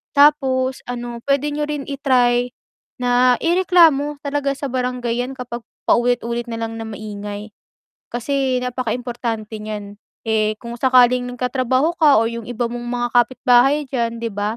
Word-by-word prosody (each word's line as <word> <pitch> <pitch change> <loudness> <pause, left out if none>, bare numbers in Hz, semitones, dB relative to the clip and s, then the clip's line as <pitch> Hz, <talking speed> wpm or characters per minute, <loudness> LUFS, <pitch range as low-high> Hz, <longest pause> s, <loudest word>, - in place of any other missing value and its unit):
Tapos 265 -3 +3
ano, 240 -1 -5
pwede 285 +1 +2
niyo 295 0 -2
rin 295 -2 -3
i-try 250 -3 +2 0.5
na 245 0 +4
ireklamo 330 -5 +3
talaga 280 -1 -1
sa 280 - -4
barangay 250 -2 -2
yan 270 - -7
kapag 240 -1 -6 0.3
paulit-ulit 240 0 +1
nalang 225 0 -4
na 225 - -5
maingay, 210 0 -7 0.6
kasi 260 +1 0
napakaimportante 240 -3 -3
niyan. 205 -1 -7 0.3
Eh, 215 -1 +1
kung 235 0 -6
sakaling 250 -1 +4
nagtatrabaho 255 +5 0
ka 290 -6 +6
o 225 - +1
yung 230 -1 -6
iba 240 0 -2
mong 240 0 -6
mga 240 0 -1
kapitbahay 255 +4 +4
diyan, 235 -2 -1
'di 230 - -1
ba, 205 +3 -2
245 Hz, 140 wpm, -20 LUFS, 235-270 Hz, 0.6 s, ka